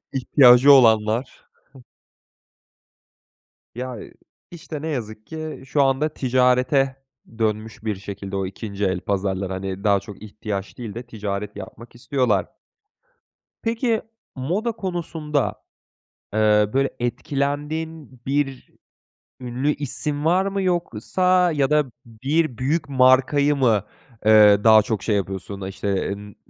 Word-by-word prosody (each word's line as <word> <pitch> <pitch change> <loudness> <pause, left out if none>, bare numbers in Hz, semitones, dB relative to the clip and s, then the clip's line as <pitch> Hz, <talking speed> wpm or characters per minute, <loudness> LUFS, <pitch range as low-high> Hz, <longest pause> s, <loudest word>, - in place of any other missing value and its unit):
İhtiyacı 130 0 +6
olanlar. 115 -1 +3 2.3
Ya, 125 0 -5 0.5
işte, 160 -3 -8
ne 160 - -4
yazık 110 -7 -5
ki 155 -3 -7
şu 140 +2 +2
anda 135 +3 +1
ticarete 130 +1 +2 0.4
dönmüş 110 0 -2
bir 110 -2 -2
şekilde 100 0 -7
o 95 -1 -1
2. 100 +1 -4
el 95 -2 0
pazarları, 95 -1 -2
hani, 95 +1 -5
daha 100 -2 +3
çok 100 -1 -12
ihtiyaç 105 -2 -6
değil 115 -5 -6
de 120 - -6
ticaret 105 -3 -5
yapmak 110 +4 -11
istiyorlar. 120 -5 0 1.2
Peki 230 0 0 0.3
moda 185 - -1
konusunda, 165 - -3 0.7
eee, 105 -1 +3
böyle 135 0 +2
etkilendiğin 145 +3 -3
bir 135 -2 -2 0.7
ünlü 130 +4 -1
isim 145 +1 -1
var 185 +4 +3
mı? 195 0 -2
Yoksa 180 - +1
ya 140 -2 +1
da 150 -1 +3 0.2
bir 130 +4 -1
büyük 140 +4 -1
markayı 135 +2 +4
mı, 115 -7 +2 0.4
ııı, 105 -2 +6
daha 110 -1 +7
çok 105 -2 -3
şey 105 - +1
yapıyorsun, 95 0 -4
işte, 100 0 -2
N 105 0 -12
125 Hz, 115 wpm, -22 LUFS, 105-145 Hz, 2.3 s, daha